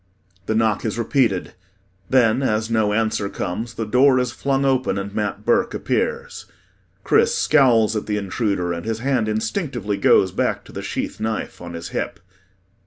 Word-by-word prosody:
The 110 - 0
knock 110 -2 +1
is 110 0 -2
repeated 115 -5 0 0.6
then 125 -1 +3
as 110 -3 0
no 110 -2 +2
answer 110 -2 0
comes, 110 +7 -4
the 115 - -3
door 130 +4 +4
is 125 -2 0
flung 135 +1 -1
open 130 -5 +1
and 100 0 -5
MAT 105 -1 -3
BURKE 235 0 +2
appears. 475 0 -2 0.6
CHRIS 460 +1 +3
scowls 120 -7 +4
at 105 - -3
the 105 -1 -1
intruder 100 -3 -1
and 85 - -5
his 110 0 -2
hand 130 -4 0
instinctively 110 - -2
goes 95 -1 +4
back - - -1
to - - -13
the - - -6
sheath - - -4
knife 110 -4 -3
on 85 -1 -8
his 85 - -6
hip. - - -4
110 Hz, 170 wpm, -21 LUFS, 105-130 Hz, 0.6 s, door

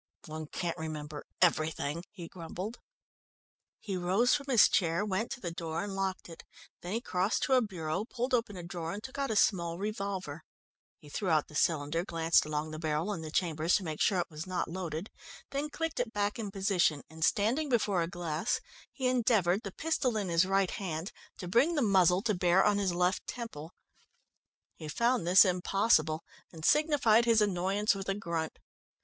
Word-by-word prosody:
"One 155 0 -6
can't 170 +2 -4
remember 150 -2 -6 0.2
everything," 155 -1 +1
he 180 -5 -9
grumbled. 185 +6 -7 1.0
He 200 -3 -4
rose 185 +7 +2
from 285 -1 -1
his 245 -5 +7
chair, 170 +2 +1
went 210 +3 -1
to 270 - -9
the 175 -7 -4
door, 165 +1 -4
and 200 -1 -5
locked 190 -1 -2
it. 165 -1 -11 0.4
Then 180 +3 -5
he 230 - -1
crossed 185 -1 0
to 265 - +2
a 255 - +6
bureau, 185 -2 -3
pulled 250 +2 -3
open 230 -5 0
a 175 - -7
drawer 170 -1 -5
and 205 +2 -7
took 265 +1 -8
out 275 - -1
a 220 - -1
small 170 -5 +2
revolver. 195 -6 -4 0.6
He 150 - -17
threw 185 +6 -3
out 155 -2 +2
the - - -14
cylinder, 155 +1 +1
glanced 165 -3 +2
along 155 +1 -3
the 155 - -6
barrel 160 +5 -1
and 165 - -6
the 155 - -6
chambers 165 0 +1
to 200 - 0
make 155 -3 -4
sure 195 - +3
it 175 - -3
was 155 +3 -7
not 180 -2 -2
loaded, 170 +1 -5 0.4
then 285 +2 -2
clicked 325 -2 -3
it 245 -2 -1
back 205 +1 -1
in 215 -3 -3
position, 190 -6 +1
and 160 +1 -7
standing 235 - +2
before 210 -7 +2
a 165 - 0
glass, 170 +2 -2 0.3
he 260 - -5
endeavoured, 220 -7 +2
the 195 - -6
pistol 260 -4 -1
in 200 -3 -2
his 170 +2 +3
right 195 -1 +2
hand, 175 -1 -4 0.3
to 180 - -6
bring 255 - +3
the 295 - +1
muzzle 190 -2 +4
to 225 -2 +1
bear 180 0 +3
on 205 -1 +3
his 195 -2 +1
left 180 +2 0
temple. 175 -10 -7 1.0
He 155 - -9
found 235 +4 +1
this 185 +3 +8
impossible, 180 -3 +2 0.3
and 160 -1 -7
signified 285 -7 +4
his 230 -1 +4
annoyance 200 +1 +1
with 195 -1 -5
a 195 - +1
grunt. 170 -5 -3
185 Hz, 190 wpm, -31 LUFS, 165-215 Hz, 1.0 s, this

